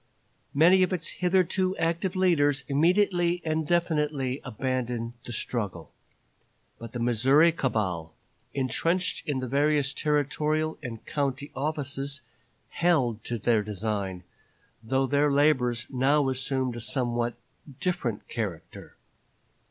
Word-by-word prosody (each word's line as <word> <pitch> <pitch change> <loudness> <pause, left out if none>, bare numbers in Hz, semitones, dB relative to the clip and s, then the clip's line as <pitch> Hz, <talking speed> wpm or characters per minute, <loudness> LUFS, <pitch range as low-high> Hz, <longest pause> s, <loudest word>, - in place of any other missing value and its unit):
Many 175 +6 +6
of 185 - +2
its 180 -3 -1
hitherto 185 +1 +1
active 170 +3 -1
leaders 145 -7 +2
immediately 175 +3 +2
and 155 -1 -1
definitely 150 -6 0
abandoned 120 -1 -3
the - - -7
struggle. 105 -7 -3 0.9
But 115 -1 -9
the 120 - -4
Missouri 130 +8 +4
cabal, 95 - -2 0.4
intrenched 165 +7 0
in 135 -3 0
the 130 - -3
various 145 +1 +2
territorial 150 +1 0
and 115 -3 -7
county 140 0 -2
offices, 140 -1 -2 0.5
held 135 -11 +1
to 120 - -2
their 110 0 +2
design, 100 -3 -3 0.6
though 130 +4 +1
their 145 +2 +2
labors 130 -5 +2
now 135 +2 +2
assumed 130 -1 -1
a - - -5
somewhat 120 -1 -1 0.4
different 125 - -2
character. 100 -8 -6
140 Hz, 115 wpm, -27 LUFS, 120-155 Hz, 0.9 s, Many